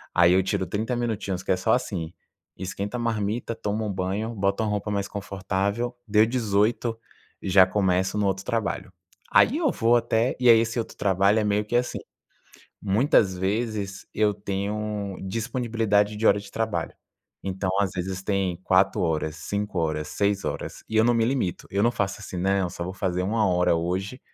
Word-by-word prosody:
Aí 85 0 +6
eu 95 - +5
tiro 95 0 -1
30 110 +7 -2
minutinhos, 100 -6 -2
que - - -1
é 90 - +3
só 90 - +2
assim: 95 -10 -2 0.4
esquenta 100 +4 -4
a - - -2
marmita, 115 0 -1
toma 110 -1 -2
um 105 - -2
banho, 95 +4 -2
bota 100 0 0
uma 110 - 0
roupa 105 0 -2
mais 100 -1 -1
confortável. 100 +4 -2
Deu 105 +1 +5
18, 115 0 0 0.4
eu - - -4
já 95 0 +7
começo 95 0 +1
no 105 - +1
outro 95 0 -2
trabalho. 115 -4 -2 0.4
Aí 280 - +5
eu 310 -6 +2
vou 120 0 +3
até 115 +2 0
e 125 - +2
aí 115 -1 +8
esse 115 +1 -1
outro 115 - -5
trabalho 100 +2 +3
é - - +1
meio 105 0 +1
que 120 - -3
assim: 125 0 0 0.8
muitas 100 - +3
vezes 100 0 -2
eu 105 -1 +3
tenho 100 0 -3
disponibilidade 110 -1 0
de 110 +2 -2
hora - - +5
de 100 -1 -12
trabalho. 110 -1 -2 0.5
Então, 95 0 -2
às 100 -2 +1
vezes, 95 +1 -3
tem 95 -3 0
4 95 0 +3
horas, 80 -2 -1
5 100 +4 -4
horas, 80 -2 -1
6 100 -1 0
horas, - - -5
e 110 - -4
eu 110 - +6
não 120 +1 +4
me 115 -1 +2
limito. 125 -8 -1
Eu 100 +1 +1
não 120 - +4
faço 100 -3 -2
assim: 95 -2 -7
"Não, 95 0 +1
só 85 - -5
vou 90 +2 -5
fazer 90 -2 -1
1 105 +2 +1
hora 90 -2 +3
hoje, 95 +9 -2
100 Hz, 185 wpm, -25 LUFS, 95-110 Hz, 0.8 s, aí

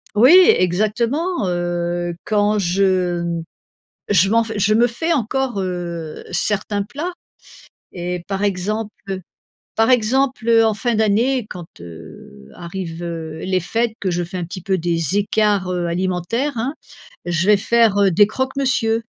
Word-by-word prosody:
Oui 245 +8 +6 0.3
exactement 220 - 0
heu 175 0 -2
quand 210 0 +1
je 175 -3 0 0.7
je 195 -1 +4
m'en 230 +2 +3
je 215 -1 0
me 240 +2 +4
fais 325 +9 -2
encore 260 -5 -1
heu 175 -3 -5
certains 205 +3 -1
plats 290 - -5 0.8
et 180 -1 -4
par 195 0 -2
exemple 200 0 -3 0.6
par 225 +2 +3
exemple 255 +1 +1 0.2
en 220 -1 +2
fin 240 +2 -1
d'année 220 +3 +1
quand 175 -2 -7 0.2
heu 80 -5 -12
arrivent 170 -1 -7
heu 160 -2 -5
les 185 +2 0
fêtes 225 +6 -1
que 190 - -1
je 175 0 -1
fais 175 +2 -6
un 180 - -3
petit 185 +2 -8
peu 190 +1 0
des 165 +1 0
écarts 205 -2 +1
heu, 175 -1 -1
alimentaires 185 - -2
hein, 265 +6 -2 0.5
je 175 +1 0
vais 210 -1 +6
faire, 220 0 +3
heu, 200 -1 +4
des 205 +4 +5
croques 260 +4 -3
monsieur. 230 -5 +1
200 Hz, 145 wpm, -20 LUFS, 175-225 Hz, 0.8 s, Oui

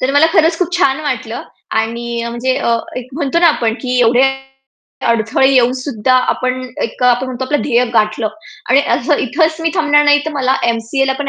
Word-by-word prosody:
तर 255 +2 0
मला 285 +3 +5
खरंच 325 +1 +3
खूप 360 -1 -2
छान 275 -5 +2
वाटलं. 250 -6 -4 0.3
आणि 235 +1 -2
अ, 235 - -4
म्हणजे 240 +2 -1 0.5
एक 250 - -13
म्हणतो 290 +2 -1
ना 345 - +5
आपण 230 -7 0
की 250 -1 -1
एवढे 240 +2 +4 0.9
अडथळे 230 +3 +2
येऊन 250 -2 +3
सुद्धा 255 -2 -1 0.2
आपण 255 0 -3 0.2
एक 230 - -5
आपण 250 +1 +2
म्हणतो 255 0 -4
आपलं 290 +3 -1
ध्येय 245 -2 +2
गाठलं. 215 0 +1 0.4
आणि 270 +2 +5 0.2
असं 260 +5 0
इथेच 320 +4 0
मी 325 0 0
थांबणार 295 -1 +3
नाही, 290 0 +5
तर 315 - -3
मला 265 -2 0
एम-सी-एला 235 +4 0
पण 285 - -2
255 Hz, 185 wpm, -15 LUFS, 235-290 Hz, 0.9 s, मला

